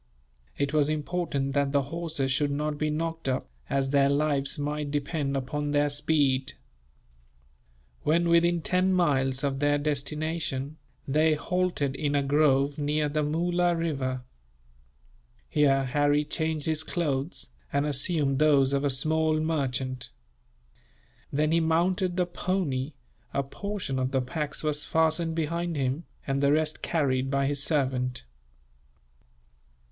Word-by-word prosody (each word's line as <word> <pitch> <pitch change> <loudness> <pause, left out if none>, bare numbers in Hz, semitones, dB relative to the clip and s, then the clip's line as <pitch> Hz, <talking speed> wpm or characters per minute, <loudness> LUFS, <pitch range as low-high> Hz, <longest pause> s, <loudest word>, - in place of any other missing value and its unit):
It 140 +1 -1
was 150 -1 +3
important 150 -3 -1
that 140 0 +1
the 140 -1 +3
horses 155 -2 -3
should 145 +2 +1
not 150 +1 -2
be 155 - 0
knocked 165 -1 -2
up, 130 - -1 0.2
as 135 -1 0
their 140 -1 +4
lives 140 0 +1
might 150 0 -2
depend 145 -1 -1
upon 145 +3 -3
their 145 0 +2
speed. 145 -2 +1 1.5
When 170 +3 +2
within 170 0 +3
ten 185 +1 +2
miles 135 -7 +1
of 135 -1 -1
their 145 0 +3
destination, 150 0 -2 0.3
they 155 +3 +3
halted 175 -4 -1
in 145 0 -1
a 140 - +2
grove 140 0 +2
near 150 +1 0
the 155 +1 0
Moola 175 +3 +1
river. 135 -6 -2 1.2
Here 135 -2 +3
Harry 145 +3 +2
changed 160 -1 -1
his 155 -1 0
clothes, 150 -3 -2 0.2
and 140 +1 +1
assumed 145 -1 +1
those 140 -3 +4
of 140 0 +1
a 145 - +2
small 155 +3 +1
merchant. 130 -5 -2 1.2
Then 150 +2 +1
he 165 - +4
mounted 175 +3 +1
the 180 - +3
pony; 170 -6 -2 0.4
a 140 - +1
portion 185 -2 -4
of 130 0 0
the 135 -1 +1
packs 150 +5 -3
was 150 -1 0
fastened 160 0 +1
behind 170 +1 -1
him, 135 +3 -1 0.2
and 135 0 -1
the 140 0 +4
rest 155 +1 0
carried 135 -5 0
by 140 0 +1
his 140 0 0
servant. 130 -4 0
145 Hz, 135 wpm, -27 LUFS, 140-160 Hz, 1.5 s, their